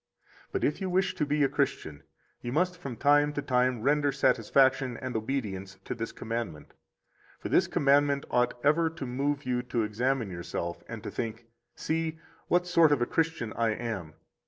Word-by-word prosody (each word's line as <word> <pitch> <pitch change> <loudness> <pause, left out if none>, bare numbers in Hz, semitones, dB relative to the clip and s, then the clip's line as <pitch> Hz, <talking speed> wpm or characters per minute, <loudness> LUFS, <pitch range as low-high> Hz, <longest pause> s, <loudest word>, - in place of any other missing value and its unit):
But - - -2
if 150 - 0
you 190 - -1
wish 185 +1 +1
to 160 -5 -1
be 150 +1 +2
a - - +5
Christian, 135 - -2 0.4
you 120 - -4
must 180 +6 +1
from 140 -8 -7
time 145 +2 +4
to 145 - -2
time 125 -2 +1
render 145 +1 +3
satisfaction 130 0 +2
and 130 -2 -5
obedience 105 -5 -3
to - - -3
this 115 -1 -4
commandment. 115 -9 -5 0.6
50 - - -33
For - - -4
this - - +4
commandment 140 0 +3
ought 125 0 +1
ever 160 +3 +4
to 165 -4 -7
move 140 +3 -1
you 125 -1 0
to 125 -2 -1
examine 115 +1 -1
yourself 85 0 -4
and 115 -3 -7
to - - -5
think: 115 0 -4 0.3
See, 160 0 -2 0.3
what 180 0 +2
sort 170 -3 +5
of 145 - +3
a - - +1
Christian 160 -7 -1
I 115 -1 +1
am! 95 -10 -5
130 Hz, 180 wpm, -29 LUFS, 115-145 Hz, 0.6 s, a